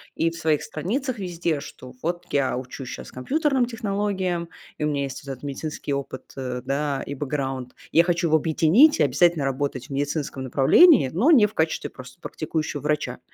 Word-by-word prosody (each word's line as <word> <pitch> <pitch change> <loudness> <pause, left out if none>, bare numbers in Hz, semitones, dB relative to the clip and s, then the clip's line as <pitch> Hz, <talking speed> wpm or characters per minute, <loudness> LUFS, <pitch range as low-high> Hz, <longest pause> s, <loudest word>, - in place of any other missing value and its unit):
и 165 - +1
в 165 - -9
своих 160 -2 +1
страницах 235 - -3
везде, 170 -4 -2
что 130 -2 -11
вот 175 +2 -3
я 135 -3 +1
учусь 130 0 -7
щас - - -8
компьютерным 270 - +1
технологиям, 200 -6 -2 0.3
и 150 - -3
у - - +2
меня 140 -2 -1
есть 135 -1 -6
вот 135 - -5
этот 130 +1 -9
медицинский 145 0 -4
опыт, 140 -1 -5
э, 125 -1 -4
да, 140 +1 -1
и 140 - -5
бэкграунд, 135 -3 -3 0.2
и - - -2
я 170 - +8
хочу 170 -1 +1
его 160 0 +4
объединить 165 - +4
и - - +5
обязательно 150 +3 +3
работать 135 -1 -2
в - - -30
медицинском 140 -1 -2
направлении, 135 - +6
но 240 - +3
не 235 -9 +7
в 210 - -4
качестве 160 -3 -1
просто 130 +6 -13
практикующего 155 -2 -3
врача, 150 -4 -1
150 Hz, 190 wpm, -24 LUFS, 135-175 Hz, 0.3 s, я